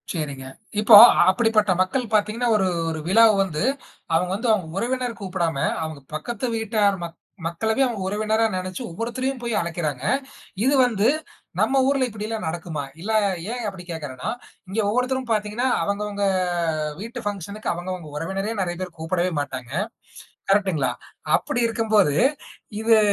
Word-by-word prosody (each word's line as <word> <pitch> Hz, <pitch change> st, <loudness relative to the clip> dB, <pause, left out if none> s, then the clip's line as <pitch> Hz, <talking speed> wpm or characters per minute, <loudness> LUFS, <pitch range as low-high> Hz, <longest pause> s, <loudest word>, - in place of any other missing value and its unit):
சரிங்க. 140 Hz, -5 st, -4 dB, 0.3 s
இப்போ 215 Hz, +1 st, +8 dB, 0.3 s
அப்படிப்பட்ட 215 Hz, 0 st, +3 dB
மக்கள் 225 Hz, +5 st, -1 dB
பார்த்தீங்கன்னா 215 Hz, +3 st, +1 dB
ஒரு 190 Hz, -2 st, +1 dB, 0.2 s
ஒரு 160 Hz, -, -4 dB
விழாவ 225 Hz, +4 st, +6 dB
வந்து 165 Hz, -3 st, -3 dB, 0.5 s
அவுங்க 180 Hz, +2 st, +1 dB
வந்து 230 Hz, +5 st, -2 dB
அவுங்க 190 Hz, -6 st, -1 dB
உறவினர் 245 Hz, +1 st, -2 dB
கூப்பிடாம, 175 Hz, -5 st, -1 dB, 0.3 s
அவுங்க 155 Hz, -2 st, -6 dB, 0.2 s
பக்கத்து 235 Hz, +11 st, -4 dB
வீட்டார் 215 Hz, -2 st, +2 dB
மக் 165 Hz, -1 st, -7 dB, 0.3 s
மக்களவே 220 Hz, +9 st, 0 dB
அவுங்க 235 Hz, -6 st, -3 dB
உறவினரா 215 Hz, +3 st, +1 dB
நெனைச்சு 185 Hz, +3 st, -4 dB
ஒவ்வொருத்தரையும் 245 Hz, +8 st, -3 dB
போய் 235 Hz, -1 st, -2 dB
அழைக்கிறாங்க. 160 Hz, -6 st, -3 dB, 0.6 s
இது 265 Hz, +3 st, +3 dB
வந்து 220 Hz, -3 st, +1 dB, 0.5 s
நம்ம 270 Hz, 0 st, +3 dB
ஊர்ல 275 Hz, -1 st, +2 dB
இப்பிடியெல்லாம் 215 Hz, -1 st, -5 dB
நடக்குமா? 160 Hz, -2 st, -4 dB, 0.2 s
இல்ல 210 Hz, +5 st, -3 dB, 0.4 s
ஏன் 245 Hz, 0 st, -4 dB
அப்பிடி 190 Hz, -3 st, -6 dB
கேட்கிறேன்னா, 150 Hz, -6 st, -5 dB, 0.4 s
இங்க 200 Hz, +4 st, -2 dB
ஒவ்வொருத்தரும் 250 Hz, +2 st, -1 dB
பார்த்தீங்கன்னா, 215 Hz, +3 st, 0 dB, 0.2 s
அவங்க, 200 Hz, +1 st, -1 dB
அவங்க 205 Hz, -1 st, -3 dB, 0.8 s
வீட்டு 230 Hz, +2 st, -6 dB
ஃபங்ஷனுக்கு 205 Hz, +1 st, -3 dB
அவங்க 175 Hz, +2 st, -5 dB
அவங்க 170 Hz, -4 st, -8 dB
உறவினரே 195 Hz, +7 st, -3 dB
நெறைய 175 Hz, -2 st, -2 dB
பேர் 180 Hz, -2 st, -6 dB
கூப்பிடவே 175 Hz, +2 st, 0 dB
மாட்டாங்க. 130 Hz, -3 st, -6 dB, 0.8 s
கரெக்ட்டுங்களா? 190 Hz, -9 st, +2 dB, 0.4 s
அப்பிடி 245 Hz, -, -2 dB
இருக்கும்போது 215 Hz, -8 st, +2 dB, 0.7 s
இது 225 Hz, 0 st, +5 dB
205 Hz, 140 wpm, -23 LUFS, 170-225 Hz, 0.8 s, இப்போ